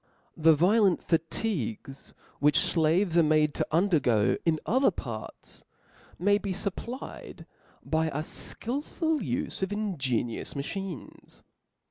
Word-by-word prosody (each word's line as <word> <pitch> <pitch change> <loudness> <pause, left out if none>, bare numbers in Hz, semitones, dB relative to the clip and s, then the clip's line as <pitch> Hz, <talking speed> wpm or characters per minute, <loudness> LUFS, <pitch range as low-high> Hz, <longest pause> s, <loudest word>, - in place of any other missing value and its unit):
The 160 0 +5
vio 190 +9 +4
lent 195 -4 +3
fatigues 160 - -3 0.2
which 145 +1 +4
flaves 170 +2 +2
are - - +7
made 155 -1 +3
to - - -2
undergo 155 - +3
in 160 -2 +2
other 260 +4 +3
parts, 115 - -8 0.5
may 205 +3 +3
be 200 -2 -3
fupplied 210 +6 -6 0.4
by 160 0 +1
a 150 0 -2
ikilful 295 - -2
ufe 255 -3 -3
of 190 +1 -1
ingenious 140 - -2
machines. 175 +3 -7
165 Hz, 115 wpm, -28 LUFS, 150-205 Hz, 0.5 s, are